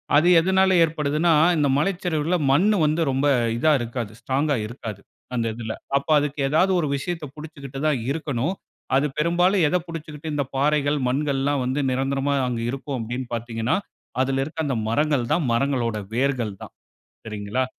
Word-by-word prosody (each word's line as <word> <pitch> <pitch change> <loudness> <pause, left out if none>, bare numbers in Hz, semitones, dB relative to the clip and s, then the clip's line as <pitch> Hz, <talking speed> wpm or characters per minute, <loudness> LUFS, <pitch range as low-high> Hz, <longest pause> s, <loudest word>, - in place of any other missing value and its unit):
அது 155 +4 +5
எதனால 190 +2 +3
ஏற்படுதுன்னா, 155 +1 +1 0.2
இந்த 145 -2 +2
மலைச்சரிவில 170 -1 0 0.2
மண் 170 +9 +4 0.2
வந்து 155 +2 +1
ரொம்ப 135 +2 +1 0.3
இதா 155 +6 +3
இருக்காது. 120 -2 -4
ஸ்ட்ராங்கா 145 +2 0
இருக்காது. 110 -4 -7 0.3
அந்த 115 -1 0
இதில. 110 -1 -4 0.2
அப்ப 140 - -4
அதுக்கு 145 0 -3
ஏதாவது 160 +7 +3
ஒரு 155 - 0
விஷயத்த 165 +3 -4
புடித்துக்கிட்டு 145 -3 -8
தான் 145 -5 +1
இருக்கணும். 145 0 -2 0.4
அது 140 +2 +3
பெரும்பாலும் 175 +4 +3
எதை 180 +4 +2
புடிச்சுக்கிட்டு 155 -1 -7
இந்த 145 -1 0
பாறைகள், 145 +1 +2
மண்கள்லாம் 140 +1 0
வந்து 130 +3 -1
நிரந்தரமா 135 +2 0
அங்க 120 -2 -2
இருக்கும் 135 +1 -4
அப்பிடின்னு 120 +3 -4
பார்த்தீங்கன்னா, 115 0 -1 0.5
அதுல 135 0 +1
இருக்க 155 +2 -4
அந்த 135 -4 -1
மரங்கள் 145 +1 +1
தான் 170 - +1
மரங்களோட 120 -3 0 0.2
வேர்கள் 125 -4 0
தான். - - -11 0.5
சரிங்களா! 105 +4 -2
140 Hz, 150 wpm, -23 LUFS, 125-155 Hz, 0.5 s, அது